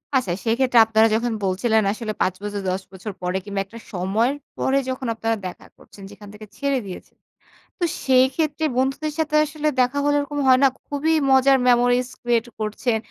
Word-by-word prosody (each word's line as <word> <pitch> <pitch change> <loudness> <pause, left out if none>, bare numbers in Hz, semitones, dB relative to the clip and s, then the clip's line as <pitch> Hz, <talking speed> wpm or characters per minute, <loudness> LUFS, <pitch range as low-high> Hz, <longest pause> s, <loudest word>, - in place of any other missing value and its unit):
আচ্ছা। 240 -9 +1
সেইক্ষেত্রে 245 +1 +3
আপনারা 220 0 +4
যখন 235 +1 -1
বলছিলেন 215 +4 +1
আসলে 220 -1 -5
৫ 185 - +2
বছর 205 -1 -4
১০ 190 +1 -2
বছর 195 +2 -7
পরে 180 +1 -1
কিংবা 200 -1 -2
একটা 230 +4 -12
সময়ের 210 +9 0 0.2
পরে 270 +1 +1
যখন 260 0 -4
আপনারা 225 0 -1
দেখা 180 - -10
করছেন 200 - -16
যেখান 205 0 -13
থেকে 215 +1 -11
ছেড়ে 280 -2 0
দিয়েছেন। 185 -2 -10 0.6
তো 355 - -2 0.2
সেইক্ষেত্রে 275 +4 +2
বন্ধুদের 270 +4 -1
সাথে 305 -1 0
আসলে 305 +1 -3
দেখা 250 +3 0
হলে 290 0 +2
এরকম 290 0 -4
হয় 255 0 +6
না, 275 - +8 0.2
খুবই 295 +3 0 0.2
মজার 265 +1 +5
memories 245 0 +3
create 240 -1 0
করছেন। 220 +2 -1
245 Hz, 175 wpm, -22 LUFS, 215-270 Hz, 0.6 s, না